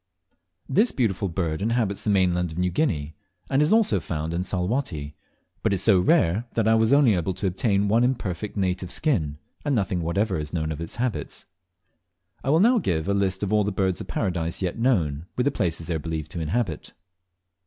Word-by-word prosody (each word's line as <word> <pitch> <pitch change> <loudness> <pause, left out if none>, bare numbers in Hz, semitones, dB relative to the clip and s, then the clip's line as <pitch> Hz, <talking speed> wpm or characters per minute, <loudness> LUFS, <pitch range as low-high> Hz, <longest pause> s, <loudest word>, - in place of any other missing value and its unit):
This 210 - +3
beautiful 105 -6 0
bird 80 -2 -2
inhabits 110 -2 0
the - - 0
mainland 90 -3 +2
of 80 - -9
New 90 0 +1
Guinea, 85 - -1 0.4
and 135 +2 +3
is 150 - +3
also 220 -1 +4
found 80 0 -4
in 85 +2 -1
Salwatty, 90 - -2 0.5
but - - +1
is 95 -1 0
so 100 -5 +5
rare 105 - +2
that 115 -2 +1
I 110 - +5
was 110 0 +3
only 140 -5 +5
able 90 0 -1
to - - -4
obtain 100 +1 +1
one 115 +4 +3
imperfect 105 -6 -2
native 90 -2 -1
skin, 85 - -1 0.3
and 145 -2 +1
nothing 95 -5 0
whatever 95 +2 0
is 75 0 -6
known 80 -2 -1
of 80 - -5
its 85 - -5
habits. 120 -2 -3 1.0
I 135 - -2
will 155 +3 +4
now 235 +5 +5
give 80 - -1
a 100 - +2
list 95 -1 0
of 100 +1 -1
all 105 -1 +4
the 105 - -1
Birds 95 -2 0
of - - -7
Paradise 85 -2 -2
yet 90 -2 -2
known, 85 - +1
with 125 - 0
the 145 - +3
places 85 -9 -2
they 85 - -2
are 80 - -1
believed 80 -1 -5
to 85 - -5
inhabit. 85 +1 -2
95 Hz, 205 wpm, -25 LUFS, 85-115 Hz, 1.0 s, so